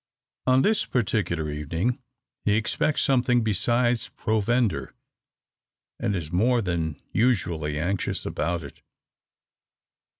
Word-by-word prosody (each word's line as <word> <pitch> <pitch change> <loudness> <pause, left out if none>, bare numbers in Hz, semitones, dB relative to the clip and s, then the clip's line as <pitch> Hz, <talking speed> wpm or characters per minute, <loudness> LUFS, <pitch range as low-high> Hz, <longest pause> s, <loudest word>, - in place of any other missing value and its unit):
On 130 +1 +5
this 215 0 +2
particular 95 - 0
evening 80 - -1 0.4
he 105 - +3
expects 120 +7 +1
something 125 -2 +3
besides 120 +3 +1
provender, 110 +1 0 1.0
and 100 - 0
is 80 -4 -4
more 120 +8 +3
than 85 -7 -2
usually 85 -11 +1
anxious 95 +5 -2
about 85 -1 -2
it. 70 - -11
105 Hz, 100 wpm, -25 LUFS, 85-120 Hz, 1.0 s, On